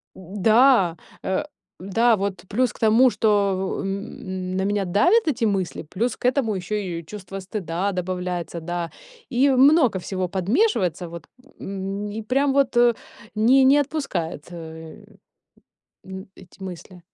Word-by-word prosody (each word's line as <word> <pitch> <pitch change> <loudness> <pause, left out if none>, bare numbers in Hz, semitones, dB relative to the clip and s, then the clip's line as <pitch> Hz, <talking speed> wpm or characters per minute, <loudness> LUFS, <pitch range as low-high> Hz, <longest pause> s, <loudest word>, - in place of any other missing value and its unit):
Да! 205 0 +3 0.3
Э, 190 +10 -1 0.4
да, 225 +4 +2
вот 195 -2 -3
плюс 245 +3 +1
к - - -17
тому, 225 +4 +5
что 200 -4 +1
н 190 -2 -5
н - - -1
на 190 - 0
меня 205 0 0
давят 350 - +3
эти 260 -6 +1
мысли, 195 -6 -1
плюс 215 +10 -2
к - - -9
этому 250 -5 +1
ещё 185 +3 -3
и 180 -5 -4
чувство 195 0 -8
стыда 190 -1 -3
добавляется, 180 -2 -3
да, 175 0 -4 0.4
и 265 +2 +3
много 265 - +5
всего 185 0 -3
подмешивается 190 - 0
вот, 170 -1 -9 0.4
м, 195 +1 -4
и 220 - -5
прям 270 +5 +1
вот, 275 -2 +2
э, 240 -1 +5 0.4
не 250 +5 +5
не 275 +2 +6
отпускает, 260 - -2
э, 160 -2 -10 1.0
н 190 0 -8
эти 185 +1 -17
мысли. 180 0 -9
195 Hz, 145 wpm, -23 LUFS, 180-240 Hz, 1.0 s, не